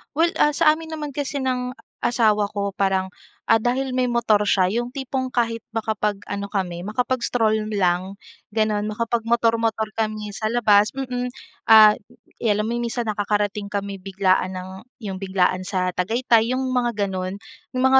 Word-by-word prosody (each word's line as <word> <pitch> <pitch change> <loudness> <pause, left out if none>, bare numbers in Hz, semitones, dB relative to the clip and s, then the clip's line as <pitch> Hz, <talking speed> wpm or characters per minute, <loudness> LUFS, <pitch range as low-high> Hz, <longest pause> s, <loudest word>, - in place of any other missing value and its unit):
Well, 330 +2 +3
ah, 295 0 +4
sa 310 0 +4
amin 320 -1 -8
naman 300 -2 -4
kasi 285 0 -3
ng 250 -1 -1 0.3
asawa 215 -3 +3
ko 200 -1 -1
parang, 190 -1 +1 0.4
ah, - - +7
dahil 255 +3 -1
may 255 - +2
motor 225 -4 +2
siya, 185 -2 +3
yung 240 +4 -2
tipong 265 -1 -3
kahit 230 -2 -1
makapag-ano 210 -2 -2
kami, 175 -3 -2
makapag-stroll 225 -1 0
lang, 185 0 +1 0.4
ganun, 215 -1 +1
makapagmotor-motor 230 -1 0
kami 215 -1 -2
sa 215 +3 -3
labas 210 -2 +4
mm. 250 -2 -3 0.3
Ah, 215 -1 +8 0.4
'yan, 210 -2 +1
alam - - -2
mo, 235 - -1
minsan 235 -1 -2
nakakarating 205 0 -1
kami 200 -1 -3
biglaan 190 -1 0
ng 185 0 -6 0.3
yung 195 -3 -5
biglaan 185 -1 0
sa 185 -1 0
Tagaytay, 225 +5 +2
yung 260 - -1
mga, 250 -1 +1 0.2
gano'n. 185 0 -3 0.4
Yung 255 - -1
mga 265 0 +6
220 Hz, 155 wpm, -22 LUFS, 200-245 Hz, 0.4 s, Ah